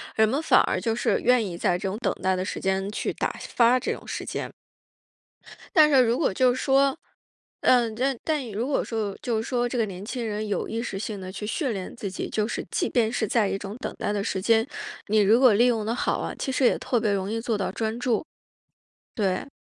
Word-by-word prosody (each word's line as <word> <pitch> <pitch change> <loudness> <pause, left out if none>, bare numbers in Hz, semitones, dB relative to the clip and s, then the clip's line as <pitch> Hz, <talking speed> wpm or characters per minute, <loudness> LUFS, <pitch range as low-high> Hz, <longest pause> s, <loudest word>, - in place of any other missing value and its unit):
人 220 0 +4
们 275 +7 0
反 - - +5
而 - - 0
就 225 -1 -1
是 - - +1
愿 250 -2 +3
意 175 -3 -5
在 175 0 +1
这 190 +1 -3
种 205 - -4
等 245 - 0
待 190 0 +3
的 185 0 -2
时 - - -4
间 190 +1 0
去 210 - -2
打 - - -2
发 240 +1 +3
这 - - -2
种 - - -7
时 - - -4
间。 - - -4 1.3
但 305 -2 +7
是 270 -3 +6
如 235 +2 +1
果 280 - +1
就 250 +3 +3
是 - - -4
说， 275 +2 +3 0.6
嗯， 235 -3 +3
但 260 +2 0
但 295 -7 -1
如 215 +4 -2
果 285 - +1
说 215 -4 -3
就 235 -3 -1
是 - - -5
说 245 -1 0
这 245 - -3
个 225 - +2
年 190 0 -8
轻 240 0 -4
人 215 0 -3
有 205 - -2
意 225 +1 -2
识 200 -5 -4
性 205 0 -4
地 185 0 -7
去 210 +2 -6
训 255 +2 -1
练 190 -2 -6
自 220 -5 -5
己， 185 - -5
就 215 0 0
是 - - -4
即 - - 0
便 230 -3 +2
是 225 -3 -1
在 210 -2 +2
一 - - -1
种 200 +2 -7
等 - - -5
待 205 - -1
的 200 -1 -1
时 190 -3 -2
间， 225 +2 +3 0.4
你 215 +1 +3
如 210 +3 +5
果 255 -3 +6
利 235 +4 +4
用 225 -4 +1
得 230 - 0
好 250 - 0
啊， - - -3
其 - - -2
实 260 0 0
也 - - +4
特 245 - 0
别 215 -2 +1
容 195 0 -1
易 225 +1 -2
做 225 -3 -1
到 195 - -1
专 225 +1 -2
注。 245 +3 0 0.9
对。 195 +1 -1
225 Hz, 265 characters per minute, -25 LUFS, 205-245 Hz, 1.3 s, 但